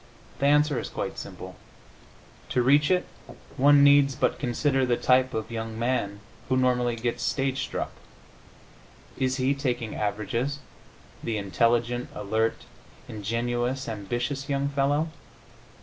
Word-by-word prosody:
The 140 - +2
answer 150 -1 +3
is - - -5
quite - - -4
simple. - - -9 0.9
To 125 - +1
reach 145 +3 +4
it 180 -1 +2 0.5
one 145 +1 +6
needs 140 -1 +6
but - - 0
consider 135 +1 +1
the 125 -2 +2
type 130 0 +3
of 110 +1 -3
young 110 -1 -4
man 115 -4 -1 0.3
who 130 - +2
normally 125 -2 +2
gets 115 +1 -2
stage 135 -1 0
struck. - - -3 1.3
Is 130 0 +1
he, 130 +1 +2
taking 125 -5 -2
averages, 110 +7 -2 0.7
the 115 -2 -1
intelligent, 120 +4 +1
alert, 110 +2 -1 0.4
ingenious, 120 +5 -2
ambitious 120 +6 -3
young 140 0 0
fellow? 145 +3 +1
125 Hz, 125 wpm, -26 LUFS, 115-140 Hz, 1.3 s, one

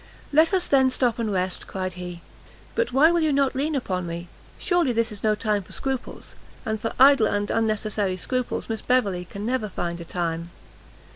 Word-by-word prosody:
"Let 315 +4 +5
us 370 -2 +2
then 265 -2 +4
stop 250 -2 +1
and 225 -2 -1
rest," 185 -1 -2
cried 185 -1 -4
he; 180 -1 -7 0.5
"but 475 - 0
why 290 +6 +5
will 345 - +2
you 310 -1 +2
not 275 -1 +2
lean 290 +3 -1
upon 185 -9 -2
me? 170 +1 -6 0.3
surely 350 -8 +1
this 230 0 +1
is 205 - -7
no 215 -1 +2
time 210 -1 0
for 185 - -12
scruples, 265 -2 -4 0.3
and 220 -1 -2
for 225 - -2
idle 270 -4 +7
and 205 0 -1
unnecessary 215 -3 0
scruples, 255 +6 -2
Miss 225 -1 -3
Beverley 200 -8 +1
can 200 +3 -7
never 240 -3 -1
find 170 -2 -4
a - - -5
time." 170 -1 -3
220 Hz, 195 wpm, -24 LUFS, 185-265 Hz, 0.5 s, idle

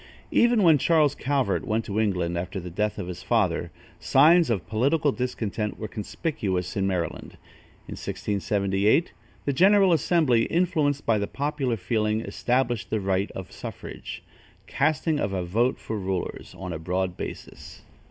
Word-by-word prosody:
Even 235 -3 +4
when 160 -4 +6
Charles 155 -3 +3
Calvert 140 -1 0
went 115 -1 -1
to 100 +1 -2
England 90 -5 0
after 90 +3 -3
the 90 -1 -7
death 105 +4 -1
of 100 - -4
his 90 -1 -6
father, - - +1 0.3
signs 165 +4 +5
of 105 -6 -1
political 140 +7 +2
discontent 110 -5 -3
were 110 - -5
conspicuous 100 - -3
in 95 -1 +1
Maryland. 90 -3 -3 0.5
In - - -6
1678, 100 - 0 0.3
the 140 - +1
general 190 +3 +5
assembly, 150 -7 +3
influenced 155 -5 +1
by 110 -2 +2
the 100 - -2
popular 140 -4 -2
feeling, 110 +2 0
established 120 -1 -1
the 110 - 0
right 95 0 0
of 95 - -8
suffrage - - -8 0.4
"casting 155 +1 0
of 100 -6 -1
a 90 -2 -2
vote 115 +8 +1
for 110 -1 -5
rulers" 95 -2 -4
on 90 -2 -5
a 80 - -5
broad 90 +2 -2
basis. - - -8
110 Hz, 150 wpm, -25 LUFS, 95-145 Hz, 0.5 s, when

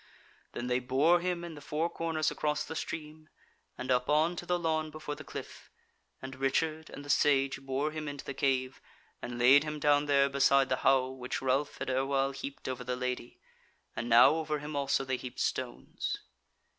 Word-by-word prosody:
Then 120 - -4
they 125 0 +1
bore 140 +8 +3
him 175 -1 -2
in 170 -1 -6
the 145 - -10
four 150 +3 -1
corners 165 -2 -1
across 150 0 -1
the 160 - -7
stream, 155 0 -6 0.5
and 130 0 -3
up 125 +1 +1
on 155 +4 +3
to 175 - -6
the 180 - +2
lawn 160 -2 -1
before 155 -1 -6
the - - -9
cliff; - - -9 0.5
and 130 0 -6
Richard 155 +4 0
and 145 - -9
the - - -11
Sage 135 -2 +2
bore 135 +3 -1
him 155 -1 -5
into 145 -1 -6
the 140 - -4
cave, 130 -1 0 0.4
and 120 0 -5
laid 130 +4 +6
him 150 0 -4
down 145 0 +3
there 140 -1 +4
beside 140 0 +3
the 130 - +1
howe 130 -1 +3
which 130 -1 -4
Ralph 135 +2 0
had - - -3
erewhile 135 +1 +1
heaped 275 - -7
over 130 -1 -4
the 125 0 -2
Lady; 125 -1 -4 0.6
and 120 - -3
now 115 +1 +8
over 155 -1 -1
him 150 +1 -6
also 140 -1 0
they 130 -1 -1
heaped 125 0 -8
stones. 125 -2 -3
140 Hz, 195 wpm, -31 LUFS, 130-155 Hz, 0.6 s, now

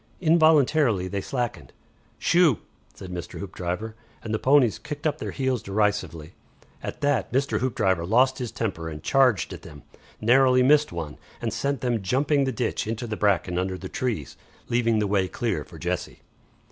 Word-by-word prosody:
Involuntarily 155 - +4
they 100 +1 -3
slackened. 120 +3 -4 0.4
"Shoo!" 170 -7 +4 0.4
said 90 - -9
Mr. 90 -1 -6
Hoopdriver, 95 +3 -4 0.3
and 110 - -4
the 110 - 0
ponies 135 -4 +4
kicked 150 +1 -7
up 155 0 0
their - - -4
heels 130 -4 -1
derisively. 100 -6 -1 0.5
At - - -6
that 145 -1 +1
Mr. 135 +2 0
Hoopdriver 95 -9 0
lost 130 +8 +3
his 125 -3 -4
temper 85 -8 -3
and 75 -1 -8
charged 130 -9 +2
at - - -9
them, 75 -1 -12 0.4
narrowly 125 +2 +4
missed 150 +3 +4
one, 80 -4 -6 0.2
and - - -3
sent 140 -3 -2
them 120 -4 0
jumping 140 +7 +1
the 135 - 0
ditch 115 -2 -2
into 115 +2 -3
the 110 -2 -4
bracken 95 -4 +1
under 95 0 -2
the 95 0 -8
trees, 110 - -3 0.3
leaving 115 -1 +2
the 105 - +1
way 100 -2 +1
clear - - -2
for - - -14
Jessie. - - -4
115 Hz, 170 wpm, -25 LUFS, 95-135 Hz, 0.5 s, Involuntarily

